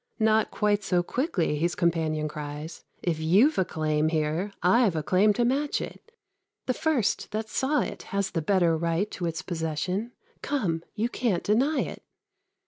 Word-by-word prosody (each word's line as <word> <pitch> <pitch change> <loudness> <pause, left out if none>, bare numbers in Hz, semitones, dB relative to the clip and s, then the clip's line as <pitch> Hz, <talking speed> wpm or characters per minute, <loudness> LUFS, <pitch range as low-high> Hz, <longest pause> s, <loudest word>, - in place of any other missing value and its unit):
"Not 220 -1 +3
quite 210 -1 +1
so 180 -2 +1
quickly," 190 - -1
his 170 +3 0
companion 160 -3 0
cries; 150 +1 -7 0.2
"If 165 -3 0
you've 195 - +4
a - - +4
claim 155 -2 0
here, 160 +5 -1
I've 200 0 +4
a 155 - -1
claim 190 +6 +4
to 240 +2 +1
match 280 +4 +1
it; 455 - -8 0.5
The 255 - +1
first 285 -7 0
that 215 +1 -4
saw 280 +6 +1
it - - -4
has 200 -1 -1
the 165 - -1
better 175 -1 +3
right 170 +5 -1
To 175 - -3
its 165 - -4
possession; 180 +7 -3 0.3
come, 195 - -1
you 225 +1 0
can't 235 -7 -1
deny 260 +9 +2
it." - - -5
185 Hz, 165 wpm, -27 LUFS, 160-225 Hz, 0.5 s, you've